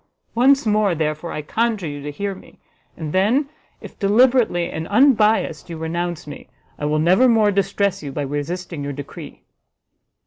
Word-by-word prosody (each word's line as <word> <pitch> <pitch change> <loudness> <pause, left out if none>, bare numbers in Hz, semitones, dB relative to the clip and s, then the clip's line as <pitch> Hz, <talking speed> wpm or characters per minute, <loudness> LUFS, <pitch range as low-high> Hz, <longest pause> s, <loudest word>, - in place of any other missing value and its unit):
Once 270 +2 +4
more, 210 -4 +2
therefore, 155 +1 -2
I 150 - -5
conjure 220 +3 -1
you 145 -2 -5
to 145 - -6
hear 200 +7 -4
me, 190 - -16 0.4
and 155 -2 -5
then 230 +10 +2 0.3
if, - - -12
deliberately 220 -3 +3
and 160 +1 -5
unbiassed, 215 - +3
you 165 - -6
renounce 170 +1 -3
me, 145 - -10 0.3
I 145 - -3
will 150 +1 +1
never 185 +11 +4
more 220 -3 +4
distress 200 0 0
you 145 -2 -6
by 145 +1 -3
resisting 145 +3 -4
your 140 0 -4
decree." 140 0 -10
180 Hz, 165 wpm, -21 LUFS, 155-215 Hz, 0.4 s, Once